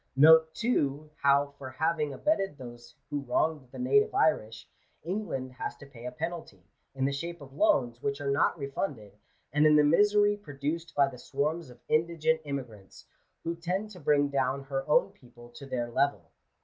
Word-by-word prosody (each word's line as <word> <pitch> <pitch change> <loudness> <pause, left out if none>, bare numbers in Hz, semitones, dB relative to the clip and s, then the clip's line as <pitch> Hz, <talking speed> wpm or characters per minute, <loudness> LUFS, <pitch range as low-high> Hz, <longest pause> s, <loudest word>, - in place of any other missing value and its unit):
Note, 160 +3 +7
too, 150 - -1
how 140 0 +3
for 130 -2 -7
having 155 +2 -1
abetted 195 - 0
those 120 -2 -11 0.2
who 145 - -1
wronged 140 +1 -1
the - - -10
native 420 - +2
Irish, 115 - +1 0.4
England 165 -8 -3
has 125 - -5
to 140 - -13
pay 125 -3 -10
a - - -4
penalty, 165 +1 -6 0.3
in 135 0 0
the 140 - +1
shape 170 +5 -5
of 135 -2 -13
loans 120 -4 +2
which 140 +1 -2
are 140 -1 -1
not 140 - +2
refunded, 140 - -4 0.4
and 150 +1 +5
in 150 - +6
the 150 - +6
misery 205 +6 +4
produced 160 -2 -5
by 140 -1 +4
the 125 -3 -9
swarms 150 +4 -2
of 125 -1 -15
indigent 160 0 +1
immigrants, 125 -9 -7 0.4
who 170 +1 -2
tend 185 +5 -3
to 185 - -11
bring 145 -2 +2
down 135 0 0
her 135 0 -4
own - - +4
people 120 -1 -17
to 135 +3 -11
their 120 -2 -3
level. 140 +4 0
145 Hz, 175 wpm, -29 LUFS, 135-165 Hz, 0.4 s, Note